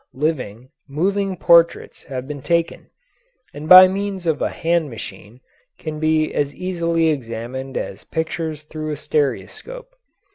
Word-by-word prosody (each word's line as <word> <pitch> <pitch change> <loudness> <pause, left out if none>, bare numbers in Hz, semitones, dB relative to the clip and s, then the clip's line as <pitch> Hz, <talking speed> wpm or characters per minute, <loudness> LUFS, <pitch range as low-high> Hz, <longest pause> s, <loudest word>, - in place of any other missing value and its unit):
Living, 130 -6 -2 0.2
moving 195 +6 -1
portraits 170 0 +3
have 130 -1 -6
been 145 -2 -6
taken, 170 +3 -1 0.7
and 150 +2 -8
by 185 0 +11
means 195 -1 -4
of 160 -3 0
a - - +1
hand 165 -2 0
machine 115 0 -10 0.4
can 155 -1 -6
be 155 0 +1
as 145 -1 -1
easily 170 -3 0
examined 130 0 -4
as - - -5
pictures 160 -1 -3
through 155 0 -6
a 150 - -3
stereoscope. 470 - -3
155 Hz, 135 wpm, -20 LUFS, 140-170 Hz, 0.7 s, by